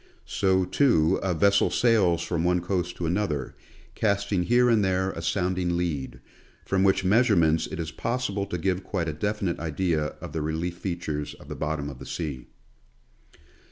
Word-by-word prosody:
So, 95 -1 +1
too, 90 - +3
a 95 -3 0
vessel 100 +4 +4
sails 95 -8 +3
from 85 -1 -1
one 90 0 +2
coast 90 0 -2
to 85 - -4
another, 80 -6 -1 0.4
cast 100 -1 0
ing 95 -3 +2
here 120 +3 +4
and 115 -3 +4
there 95 0 +1
a 85 - -6
sounding 90 0 0
lead, 80 -7 -3 0.5
from 95 -1 +1
which 95 -1 +3
measurements 95 -7 +3
it 95 - -7
is 80 -1 -3
possible 115 -5 -2
to 90 - -3
give 95 +2 -1
quite 90 -3 -2
a 80 - -2
definite 100 +2 -2
idea 80 -2 -1
of - - -8
the 80 - -2
relief 80 +3 -2
features 75 -5 -4
of - - -15
the - - -5
bottom 75 -1 -2
of 70 -3 -8
the - - -9
sea. 70 -7 -5
90 Hz, 175 wpm, -26 LUFS, 80-100 Hz, 0.5 s, vessel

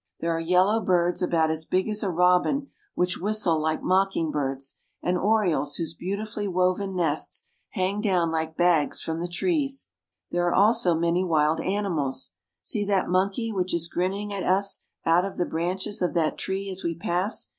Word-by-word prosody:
There 165 0 0
are - - -1
yellow 180 +6 +3
birds 175 -3 +1
about 165 -3 +2
as 160 0 -2
big 185 +4 0
as 215 -1 -1
a 200 - 0
robin, 180 - +2 0.2
which 180 0 0
whistle 190 -5 +2
Hke 155 0 -1
mocking 185 -4 +1
birds, 135 -2 -3 0.2
and 180 - +1
orioles 180 -7 +1
whose 165 -1 -2
beautifully 205 +4 -4
woven 185 +1 0
nests 160 -4 -1 0.2
hang 190 +3 -1
down 180 -6 +1
like 160 0 -2
bags 175 -4 +2
from 160 0 -3
the 175 - -2
trees. 275 - -1 0.4
There 175 0 +1
are 175 - +1
also 205 -3 +4
many 170 +2 +1
wild 155 -3 +2
animals. 165 - -1 0.3
See 210 - -1
that 200 -2 +1
monkey 195 +5 0
which 185 -2 -1
is 170 -1 0
grinning 195 +4 -2
at 195 - -3
us 195 +2 +1 0.2
out 165 +2 +4
of 195 - -5
the 175 - +1
branches 185 +6 -2
of 180 0 0
that 160 -2 +1
tree 195 +1 -3
as 190 0 -5
we 170 -1 -1
pass. 175 +5 0
180 Hz, 175 wpm, -26 LUFS, 165-195 Hz, 0.4 s, also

